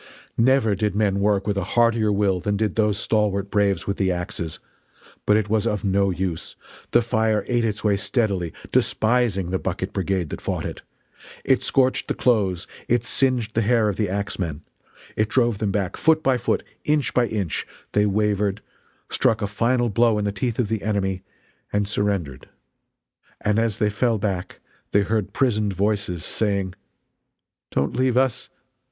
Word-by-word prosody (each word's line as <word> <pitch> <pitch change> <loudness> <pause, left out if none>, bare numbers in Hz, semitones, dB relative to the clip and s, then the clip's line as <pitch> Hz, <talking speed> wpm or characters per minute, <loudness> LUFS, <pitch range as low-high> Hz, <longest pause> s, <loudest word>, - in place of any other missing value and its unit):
Never 115 -2 +3
did 100 0 -1
men 100 -2 +1
work 100 -1 +2
with 100 -1 -1
a - - -2
heartier 115 -2 +4
will 100 -2 +1
than 100 +3 -1
did 105 -3 -1
those 105 -2 +2
stalwart 100 -2 0
braves 100 -3 +1
with 100 - -2
the 95 -2 +1
axes. 90 -2 -4 0.7
But 105 - +5
it 110 -1 0
was 105 0 +1
of 105 -2 -1
no 100 0 +2
use. 90 -2 -3 0.3
The 120 - +4
fire 110 -2 +1
ate 120 -1 +1
its 105 -2 -2
way 105 -2 +3
steadily, 100 -5 0 0.2
despising 110 -6 +1
the 95 - 0
bucket 95 +1 -3
brigade 95 -4 -1
that - - -5
fought - - -3
it. - - -6 0.6
It 130 -2 +3
scorched 130 0 +1
the - - -1
clothes, 100 -7 +1 0.2
it 120 -1 +1
singed 125 -5 0
the 115 - +2
hair 110 -1 +3
of 100 - -2
the 105 -4 0
axemen 90 -6 -3 0.5
it 105 0 +1
drove 120 -4 +2
them 105 -3 0
back, 95 -2 -1
foot 160 -1 +3
by 130 -1 +3
foot 125 - 0 0.2
inch 150 -3 +1
by 125 -1 +3
inch 100 -8 -2 0.2
they 105 0 +3
wavered, 105 0 0 0.4
struck 110 - +2
a - - +2
final 120 +4 +1
blow 115 +1 +3
in 105 - -1
the 100 - 0
teeth 110 +3 -2
of 125 - +1
the 110 0 -2
enemy, 95 -3 -1 0.5
and 105 0 0
surrendered. 100 -10 -2 0.9
And 105 +1 +1
as 115 -2 0
they 105 -2 +1
fell 115 +1 +1
back 95 -3 -3 0.3
they 100 - +5
heard 105 0 -1
prisoned 105 -6 +1
voices 100 -3 -1
saying: 100 -4 -1 1.0
"Don't 70 - -1
leave 130 -1 +2
us! 130 -2 +1
105 Hz, 170 wpm, -23 LUFS, 100-115 Hz, 1.0 s, But